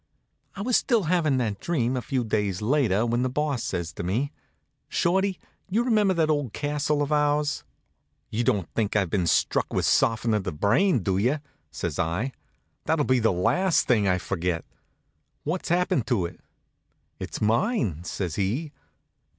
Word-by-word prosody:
I 200 - -4
was 245 +1 +3
still 235 -6 +2
havin' 160 -5 +2
that 110 -5 -1
dream, 130 -7 0
a 125 - -1
few 130 0 -1
days 105 -4 -1
later, 115 -3 +2
when 120 +1 0
the 130 - +1
Boss 140 -1 -1
says 85 -4 -3
to - - -6
me: 115 +11 -1 0.6
"Shorty, 190 +2 +1 0.3
you 220 +5 +2
remember 210 -6 +3
that 160 -2 +2
old 145 -7 -1
castle 145 0 0
of 145 - -4
ours?" 150 - +1 0.7
"You 115 +2 0
don't 100 -7 +1
think 105 -3 -1
I've 95 -5 +1
been 90 -4 +1
struck - - +1
with - - 0
softenin' 115 0 +2
of 105 -2 +1
the 95 - -3
brain, 115 - +2
do 95 0 +1
you?" 125 +8 +2 0.3
says - - -4
I. 90 +11 -1 0.5
"That'll 155 -2 +1
be 130 -1 +3
the 110 -1 +3
last 165 - +2
thing 105 -5 +3
I'll 90 -1 +3
forget. 90 -2 -2 0.8
What's 170 +5 -3
happened 175 - +1
to 110 -9 +1
it?" 85 0 -8 0.8
"It's - - -5
mine," 110 - +1
says 90 -1 -4
he. 120 +11 -1
125 Hz, 165 wpm, -26 LUFS, 100-155 Hz, 0.8 s, was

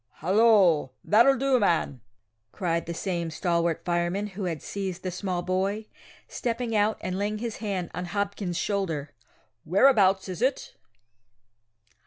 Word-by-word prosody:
"Hallo, 185 - +3
that'll 240 +6 +5
do, 265 0 +2
man!" 165 - 0 0.5
cried 170 -3 -2
the 170 - -3
same 170 -2 -2
stalwart 170 0 -1
fireman 175 +3 0
who 200 -1 -5
had 165 -3 -4
seized 190 -3 -5
the 185 - -3
small 180 -1 -3
boy, 195 +4 -1 0.4
stepping 230 -1 -3
out 210 +1 +2
and 185 +1 -3
laying 210 +1 -1
his 230 0 -4
hand 195 -5 -3
on 180 - -4
Hopkins's 200 -2 -3
shoulder, 165 -8 -2 0.5
whereabouts 195 - +4
is 185 +2 -6
it? 260 +2 0
190 Hz, 135 wpm, -26 LUFS, 175-210 Hz, 0.5 s, that'll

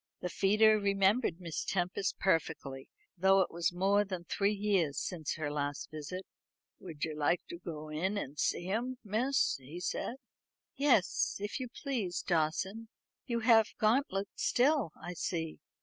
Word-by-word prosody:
The 180 - -2
feeder 215 +4 +4
remembered 200 -1 +2
Miss 170 -3 -4
Tempest 185 +1 -1
perfectly, 160 -7 -1 0.3
though 190 +2 +5
it 185 - 0
was 170 0 0
more 195 +3 +3
than 185 -3 -5
three 200 +3 +1
years 195 -8 +1
since 165 -5 -3
her 155 -2 -3
last 145 -1 -3
visit. 155 +5 -6 0.5
"Would 160 -5 -7
you 155 -1 -5
like 150 +3 +1
to 170 - -7
go 155 -3 -7
in 185 +7 -1
and 145 -6 -5
see 175 - 0
'em, 245 +4 -1
miss?" 235 +6 +1
he 140 +6 -9
said. 205 +6 -2 0.6
"Yes, 265 -9 +2
if 205 +6 -3
you 255 - -3
please, 235 - -3
Dawson. 190 +7 0 0.4
You 235 -2 -1
have 225 -2 +5
Gauntlet 215 -3 +1
still, 270 - +2
I 175 +2 -6
see. 160 -1 -3
190 Hz, 150 wpm, -32 LUFS, 165-215 Hz, 0.6 s, though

